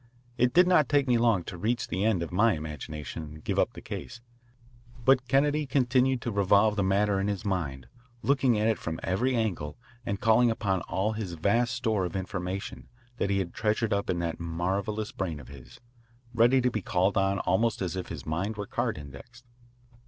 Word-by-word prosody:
It 125 0 +2
did 180 +6 +6
not 180 -5 +4
take 145 -2 +3
me 120 -2 +3
long 115 -6 +3
to 85 - -8
reach 115 +5 -1
the 95 +4 -2
end 105 -6 +2
of 85 - -6
my 105 +5 +3
imagination 75 0 -6
and 75 0 -10
give - - -1
up - - +1
the - - -11
case, 120 - -7 0.9
but 130 -1 +4
Kennedy 145 +3 +2
continued 130 -1 +2
to 120 - -2
revolve 100 +1 +3
the 100 - 0
matter 100 +1 +2
in 100 - 0
his 100 -2 -3
mind, 70 -10 -2 0.4
looking 135 -4 +3
at 105 +1 +1
it 115 - +1
from 80 -1 -4
every 125 +8 0
angle 90 -10 -2 0.3
and 100 -3 -3
calling 115 +1 +4
upon 100 -5 0
all 100 +4 0
the 110 0 -3 0.2
vast 120 +7 +2
store 110 -6 0
of 90 -1 -4
information 95 +2 -4 0.3
that 100 - 0
he 100 - +1
had 95 -3 -2
treasured 110 0 0
up 100 0 -1
in 90 - +1
that 85 -1 -3
marvellous 95 +6 -2
brain 85 -6 -4
of 60 - -12
his, 65 -3 -13 0.5
ready 120 +3 +4
to 125 0 +1
be 110 - -2
called 95 +2 +1
on 95 0 +2
almost 105 +6 +1
as 90 -2 -2
if 95 - -4
his 75 -5 -7
mind 95 +7 -2
were 105 - -3
card 120 0 -2
indexed. 75 - -12
100 Hz, 200 wpm, -28 LUFS, 90-120 Hz, 0.9 s, did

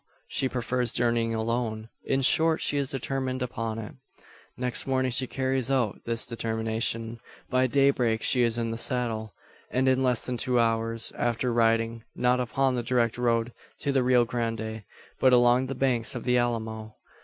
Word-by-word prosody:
She 130 - 0
prefers 125 0 -1
journeying 115 -1 +1
alone. 110 -1 -2 0.2
In 135 0 0
short, 160 +4 +3
she 145 - +1
is 140 -2 -2
determined 130 -1 -3
upon 115 -2 -4
it. 110 -2 -7 0.6
Next 125 0 -1
morning 130 -1 0
she 130 +2 +3
carries 130 -1 -1
out 125 -6 0
this 115 0 +1
determination. 115 0 -2 0.3
By 130 0 +3
day 140 +2 +4
break 115 -4 -1
she 125 - +3
is 115 -1 +1
in 115 -1 -1
the 115 - -4
saddle; 115 -4 -1 0.3
and, 130 +1 0
in 130 0 +3
less 125 -2 +1
than 125 -1 -3
two 125 0 +1
hours 115 0 +2
after, 120 +1 0
riding, 115 0 +1
not 125 0 +2
upon 130 +2 0
the 120 - -1
direct 120 -1 0
road 120 -1 0 0.3
to 140 - 0
the 135 -1 +2
Rio 125 -1 +3
Grande, 115 -2 -4 0.3
but 130 -1 +4
along 125 +1 +4
the 135 - -4
banks 125 -3 0
of 120 - -5
the 125 -1 +1
Alamo! 110 -2 -2
120 Hz, 175 wpm, -27 LUFS, 115-130 Hz, 0.6 s, day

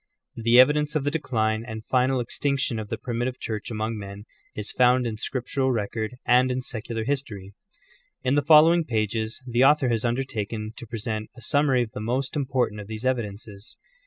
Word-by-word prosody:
The 115 +2 +4
evidence 150 +3 +4
of 150 - +1
the 145 - 0
decline 110 -8 0
and 110 -1 -7
final 130 0 +2
extinction 130 0 -1
of 105 -1 -6
the - - -3
primitive 120 +1 -3
Church 110 -2 -4
among 110 0 -3
men 100 +1 -9 0.3
is 105 0 -4
found 125 0 +4
in 110 -2 -3
scriptural 130 +3 -1
record, 110 +1 -3
and 125 +1 +4
in 130 0 -2
secular 115 -2 -4
history. 110 -7 -3 0.7
In 130 0 +1
the 145 - +3
following 160 +3 +6
pages 110 -2 -2
the 120 0 +2
author 140 -2 +5
has 115 -2 0
undertaken 115 -3 -2
to 120 - -9
present 110 -1 -4
a - - -11
summary 140 -4 +2
of 110 - -8
the - - -7
most 125 +6 -2
important 130 -7 -1
of 100 - -10
these 110 +2 -6
evidences. 105 -4 -3
120 Hz, 180 wpm, -25 LUFS, 110-130 Hz, 0.7 s, following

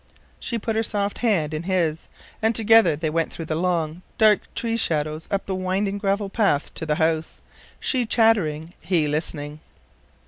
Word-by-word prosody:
She 235 - -3
put 225 0 -2
her 220 - +2
soft 205 -2 -2
hand 180 -10 +1
in 155 - -2
his, 170 -3 -1 0.3
and 220 +1 +2
together 225 -6 +5
they 155 +1 -2
went 165 0 0
through 165 - -7
the 155 - -3
long, 170 -1 -1 0.2
dark 215 -2 +3
tree 230 -1 -1
shadows 155 -6 -1
up 200 -1 -1
the 195 - -3
winding 190 +2 -1
gravel 200 0 0
path 195 -8 0
to 160 - -5
the 150 - +1
house, 160 0 0 0.4
she 250 -4 0
chattering, 175 -9 +2
he 170 -5 +1
listening. 150 0 -3
185 Hz, 170 wpm, -23 LUFS, 155-210 Hz, 0.4 s, together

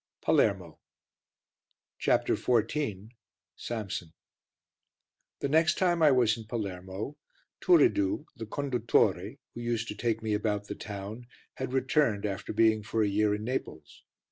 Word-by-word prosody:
PALERMO - - +1 1.2
CHAPTER - - +2
XIV 110 -4 0 0.5
SAMSON 100 -8 -5 1.3
The - - 0
next 160 +4 +3
time 175 -2 +2
I 155 - +7
was 125 -5 +4
in 115 - -9
Palermo, 100 +2 -5 0.4
Turiddu, 320 -3 +3
the 115 -4 -7
conduttore, 115 -6 +1 0.2
who 120 - -7
used 120 -1 -1
to - - -4
take 115 +1 -1
me 110 -1 0
about 105 -1 -1
the - - -5
town, 105 +3 -7 0.3
had 130 -1 -5
returned 130 -5 +1
after 100 -2 -3
being 110 0 +3
for 110 +1 0
a - - +2
year 105 +1 +2
in 105 - -6
Naples. 120 -10 -5
110 Hz, 130 wpm, -29 LUFS, 105-130 Hz, 1.3 s, I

